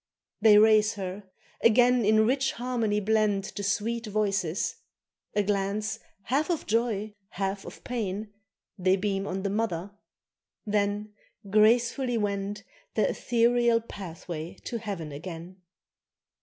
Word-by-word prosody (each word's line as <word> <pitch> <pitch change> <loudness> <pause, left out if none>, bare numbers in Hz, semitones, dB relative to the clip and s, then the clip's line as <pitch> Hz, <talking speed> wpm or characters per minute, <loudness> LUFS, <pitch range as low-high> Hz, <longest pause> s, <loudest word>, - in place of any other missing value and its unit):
They 210 -1 +7
raise 215 0 +5
her; 190 0 -6 0.3
again 245 +1 +5
in 220 +1 +5
rich 270 +3 +1
harmony 230 -4 -1
blend 210 -1 +2
The 205 - -3
sweet 225 +3 -1
voices; 195 -4 -1 0.6
a 205 - +3
glance 200 +1 -1 0.2
half 285 - 0
of 340 -3 -1
joy, 215 -2 0 0.2
half 195 -1 -3
of - - -11
pain 210 -3 -3 0.5
They 185 +1 +4
beam 195 0 -1
on 190 +1 -3
the 200 - -1
mother, 205 -3 -2 0.7
then 205 0 -1 0.4
gracefully 235 +4 +3
wend 205 -1 -2 0.3
Their - - +2
ethereal 235 -1 +2
pathway 175 -6 -7
to 235 - -3
heaven 195 -8 -5
again. 170 +4 -8
210 Hz, 120 wpm, -28 LUFS, 195-230 Hz, 0.7 s, They